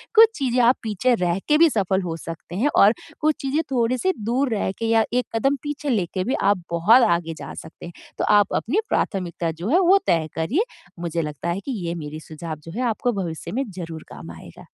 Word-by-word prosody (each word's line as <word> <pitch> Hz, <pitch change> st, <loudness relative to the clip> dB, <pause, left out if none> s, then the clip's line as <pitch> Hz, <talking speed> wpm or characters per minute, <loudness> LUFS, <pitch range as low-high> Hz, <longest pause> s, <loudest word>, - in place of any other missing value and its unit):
कुछ 450 Hz, 0 st, +9 dB
चीज़ें 255 Hz, -3 st, 0 dB
आप 245 Hz, +2 st, +5 dB
पीछे 220 Hz, +4 st, +1 dB
रह 180 Hz, -3 st, 0 dB
के 300 Hz, -, +4 dB
भी 330 Hz, 0 st, +6 dB
सफ़ल 195 Hz, -, 0 dB
हो 170 Hz, -3 st, -3 dB
सकते 165 Hz, +1 st, -8 dB
हैं 245 Hz, +10 st, +2 dB
और 205 Hz, +2 st, +7 dB, 0.3 s
कुछ 310 Hz, 0 st, +2 dB
चीज़ें 275 Hz, +4 st, 0 dB
थोड़ी-सी 255 Hz, +9 st, +1 dB
दूर 250 Hz, +4 st, +1 dB
रह 200 Hz, -, -1 dB
के 230 Hz, -, -2 dB
या 225 Hz, -1 st, +4 dB
1 250 Hz, 0 st, +1 dB
कदम 275 Hz, +5 st, +2 dB
पीछे 295 Hz, 0 st, -4 dB
लेके 185 Hz, -5 st, 0 dB
भी 255 Hz, -, -1 dB
आप 195 Hz, -2 st, +2 dB
बहुत 210 Hz, +10 st, +5 dB
आगे 170 Hz, -1 st, 0 dB
जा -, -, -8 dB
सकते 160 Hz, -, -10 dB
हैं। 175 Hz, -, -9 dB, 0.2 s
तो -, -, 0 dB
आप 205 Hz, -1 st, +2 dB
अपनी 310 Hz, -, 0 dB
प्राथमिकता 175 Hz, -3 st, -1 dB
जो 170 Hz, +6 st, -5 dB
है 340 Hz, +7 st, +4 dB
वो 380 Hz, +1 st, +6 dB
तय 165 Hz, -2 st, +2 dB
करिए 220 Hz, -, +1 dB, 0.4 s
मुझे 170 Hz, -1 st, -2 dB
लगता 150 Hz, +2 st, -4 dB
है 175 Hz, +3 st, -1 dB
कि 275 Hz, -, -3 dB, 0.2 s
ये 170 Hz, -, -2 dB
मेरी 155 Hz, -1 st, -6 dB
सुझाव 160 Hz, +1 st, -7 dB
जो 165 Hz, -, -8 dB
है 245 Hz, -, -2 dB
आपको 245 Hz, +3 st, -1 dB
भविष्य 160 Hz, -2 st, -6 dB
में 260 Hz, -, -1 dB
ज़रूर 165 Hz, -3 st, -7 dB
काम 80 Hz, +3 st, -9 dB
आएगा। 80 Hz, -, -12 dB
200 Hz, 220 wpm, -23 LUFS, 170-255 Hz, 0.4 s, कुछ